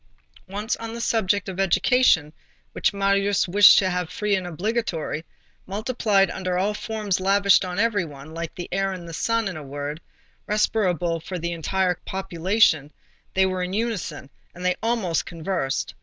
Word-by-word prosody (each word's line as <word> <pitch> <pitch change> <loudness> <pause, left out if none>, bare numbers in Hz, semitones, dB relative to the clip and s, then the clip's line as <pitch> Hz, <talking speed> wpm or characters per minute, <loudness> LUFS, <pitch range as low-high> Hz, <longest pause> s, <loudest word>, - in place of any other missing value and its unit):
Once, 205 +4 -2
on 230 0 -6
the - - -6
subject 205 -4 +1
of 190 -1 -6
education, 195 - +3 0.4
which - - +1
Marius 200 0 +1
wished 205 +3 +8
to 190 - +4
have 180 -2 -2
free 210 +2 -1
and 185 -2 -3
obligatory, 175 -3 -2 0.4
multiplied 210 -1 +1
under 185 -1 -2
all 200 +3 +1
forms 210 -3 -2
lavished 200 +1 +4
on 180 -1 -4
every 210 -3 +2
one, 145 -1 -10
like 165 0 -5
the 175 - -6
air 195 0 0
and 175 -2 -8
the 165 - -8
sun 230 +5 0
in 190 - -4
a 155 - -6
word, 145 +2 -6 0.5
respirable 180 -6 +1
for 180 +3 -6
the 170 0 -3
entire 180 +2 0
population, 185 -4 +1 0.4
they 190 0 +4
were 185 -1 -1
in 180 +1 -3
unison, 210 - -3 0.2
and 180 +1 -7
they 180 - +2
almost 225 -8 0
conversed. 165 -5 -2
190 Hz, 165 wpm, -24 LUFS, 170-205 Hz, 0.5 s, wished